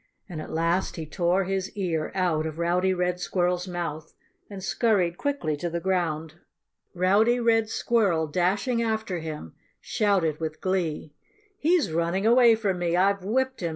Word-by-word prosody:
And 170 -5 -6
at - - -8
last 165 +3 0
he 160 - -5
tore 175 +4 +1
his 190 0 -2
ear 165 -5 -1
out 165 -4 +1
of 155 0 -7
Rowdy 175 +2 +1
Red 180 -1 -1
Squirrel's 180 0 -1
mouth 165 -3 -5 0.3
and 195 -2 -8
scurried 195 -5 +1
quickly 280 - -1
to 175 +4 -3
the 170 +1 -3
ground. 165 -3 -2 0.6
Rowdy 205 +7 +3
Red 225 -2 +2
Squirrel, 200 -12 +1
dashing 190 - 0
after 220 -5 -2
him, 155 - -7 0.3
shouted 185 -8 0
with 155 -1 -4
glee. 170 -5 -2 0.5
"He's 330 - +2
running 170 +5 0
away 235 0 +6
from 200 -5 -1
me! 175 -1 0
I've 195 +1 +2
whipped 260 +6 0
him!" 170 - -2
180 Hz, 155 wpm, -26 LUFS, 165-205 Hz, 0.6 s, away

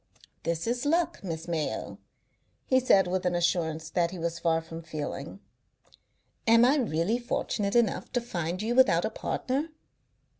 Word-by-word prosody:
"This 165 0 -2
is 245 +2 -1
luck, 330 +1 +1
Miss 165 -3 -5
Mayo," 160 -3 -3 0.7
he 260 - +4
said, 200 -7 +4
with 185 +1 -1
an 180 -1 +1
assurance 160 -2 0
that 170 -1 +1
he 185 - -7
was 170 0 -3
far 165 -1 +2
from 165 0 -8
feeling. 155 +2 -6 1.1
"Am 230 +1 +7
I 275 +4 +4
really 215 - 0
fortunate 210 -4 -2
enough 235 -4 +1
to 245 - +2
find 180 -4 -3
you 230 +2 0
without 260 +1 +4
a - - -2
partner?" 280 +5 -2
185 Hz, 155 wpm, -28 LUFS, 165-240 Hz, 1.1 s, Am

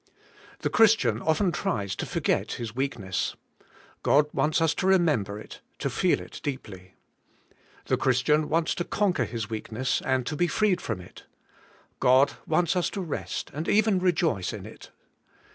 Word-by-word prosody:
The - - -1
Christian 205 - +4
often 175 +4 +2
tries 100 - -2
to - - -3
forget - - 0
his 115 -2 -6
weakness: 115 -9 -2 0.7
God 145 +1 +4
wants 150 +4 +1
us 165 -1 +2
to 185 - -1
remember 150 - +2
it, - - -11 0.2
to - - -2
feel - - +2
it - - -10
deeply. 95 -10 -6 0.9
The - - +1
Christian 140 +4 +2
wants 165 +1 +1
to 175 - -2
conquer 200 0 0
his 115 -4 -4
weakness 110 +4 -2
and 130 -2 0
to 150 - -3
be 175 +4 +2
freed 185 +1 +1
from 110 -6 -4
it: 90 - -15 0.7
God 130 +2 +5
wants 170 +3 +2
us 180 - +1
to 195 - -4
rest 165 -5 -4
and 155 +3 -4
even 210 -2 +3
re 180 0 +3
joice 120 - -1
in - - -7
it. - - -12
145 Hz, 160 wpm, -27 LUFS, 115-175 Hz, 0.9 s, God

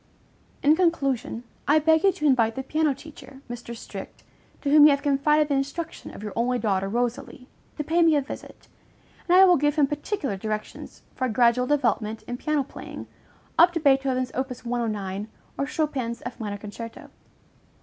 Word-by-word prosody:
In 295 +2 +6
conclusion, 275 -8 0 0.2
I 295 - +5
beg 320 +1 +4
you 395 - +5
to 305 - -5
invite 230 -5 +3
the 265 - -4
piano 305 0 +1
teacher, 275 -3 -13
Mr. 240 -1 -7
Strict, - - -9 0.4
to 280 - 0
whom 300 0 +8
you - - +9
have 280 0 +1
confided 300 +1 +3
the 290 - 0
instruction 280 +5 -3
of - - -10
your 210 - -5
only 250 +2 +1
daughter, 195 -4 0
Rosalie, 245 +2 -3 0.3
to 300 - -2
pay 330 +4 +1
me 325 -2 +5
a 290 - +3
visit, 275 - -10 0.6
and 360 - +6
I 380 - +9
will 360 -2 +5
give 295 +1 +1
him 300 -3 +4
particular 295 - -3
directions 215 +2 -6
for 260 - -2
a - - -1
gradual 240 +2 +3
development 235 -6 0
in 245 - -5
piano 300 +1 0
playing, 265 - -9 0.5
up 345 +1 +7
to 335 - -1
Beethoven's 270 -3 +2
op. 265 +1 -2
109 220 -5 -3 0.3
or 275 - -2
Chopin's 275 -7 -2
F 245 - -7
minor 205 -2 -4
concerto. 220 +3 -9
270 Hz, 180 wpm, -25 LUFS, 235-300 Hz, 0.6 s, you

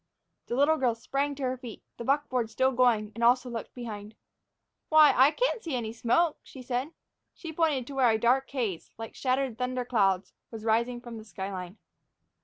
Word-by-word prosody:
The 240 - -2
little 290 +4 +4
girl 245 -5 +1
sprang 275 +5 -2
to 275 - -6
her 255 0 -1
feet, 240 -3 -10
the - - -6
buckboard 255 -3 0
still 260 +4 +2
going, 240 -4 +2
and 235 - -4
also 245 +1 +3
looked 230 -1 -6
behind. 215 -3 -7 0.7
"Why, 310 -1 +7
I 265 +3 +7
can - - 0
see 245 - -3
smoke," 290 +8 +1
she 260 - -12
said. 250 +4 -2 0.4
She 330 -2 -8
pointed 305 -6 +1
to 280 - -9
where 260 -3 +4
a 220 - +3
dark 250 +4 +2
haze, 225 -11 -3
like 225 0 -7
shattered 260 -2 -1
thunder 250 0 -2
clouds, 195 -6 +1 0.2
was 225 -1 -8
rising 235 +2 +1
from 240 -2 -8
the - - -10
sky 195 -1 -6
line. 185 +1 -7
245 Hz, 190 wpm, -28 LUFS, 225-270 Hz, 0.7 s, Why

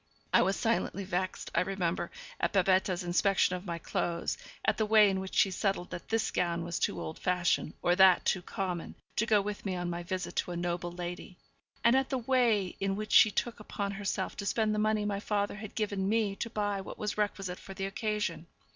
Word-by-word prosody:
I - - +7
was 195 - +2
silently 225 -3 0
vexed, 185 0 -3
I - - +3
remember, 180 -2 -1 0.3
at - - 0
Babette's 185 -1 +2
inspection 180 +1 +2
of 180 +2 -7
my 170 -1 -2
clothes; 170 +1 -2 0.3
at - - +2
the 220 - +2
way 210 -2 +6
in 190 - -1
which 190 0 -6
she 195 - +4
settled 190 -1 -1
that 175 - -7
this 225 -1 +1
gown 170 -1 0
was 170 0 -3
too 90 - 0
old 80 -2 -6
fashioned, 180 -3 +1
or 175 - +4
that 190 -1 +6
too 185 - +2
common, 180 -1 -4 0.2
to 220 - +2
go 210 -2 +4
with 205 0 -5
me 190 -2 -2
on 175 -1 -2
my 170 0 -3
visit 185 +1 -4
to - - 0
a - - -4
noble 175 0 -2
lady; 175 +1 -6 0.5
and 235 +2 +5
at 265 0 +2
the 265 - 0
way 235 -6 +2
in 195 0 0
which 215 +1 -5
she 215 - +8
took 225 +3 -2
upon 200 -1 -3
herself 195 -1 -2
to 200 - -4
spend 215 +1 +1
the 210 - 0
money 215 0 +1
my 200 -1 -1
father 205 -1 -1
had 215 -1 -8
given 200 -3 -1
me 215 -2 +1
to 230 - -3
buy 205 -3 -1
what - - -8
was 210 -1 -2
requisite 195 -3 -2
for 195 - -10
the 195 - -3
occasion. 200 -4 -2
195 Hz, 220 wpm, -31 LUFS, 180-210 Hz, 0.5 s, she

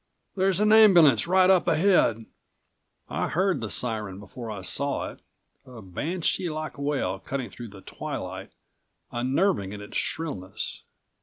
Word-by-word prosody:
There's 190 0 +2
an 210 +1 +4
ambulance 175 - +7
right 185 +1 +5
up 185 -2 +4
ahead!" 155 - +3 0.8
I - - -2
heard 190 -1 0
the 110 - -4
siren 105 -6 -3
before 115 +3 -9
I 100 -3 -6
saw 140 +9 -1
it, - - -16 0.4
a 125 -2 -12
banshee 165 - -2
like 155 -1 -5
wail 140 0 -1
cutting 130 -6 -5
through 120 +5 -9
the 100 -2 -13
twilight, - - -6 0.6
unnerving 130 - 0
in 105 - -7
its 105 - -6
shrillness. 135 - -3
140 Hz, 140 wpm, -26 LUFS, 110-180 Hz, 0.8 s, ambulance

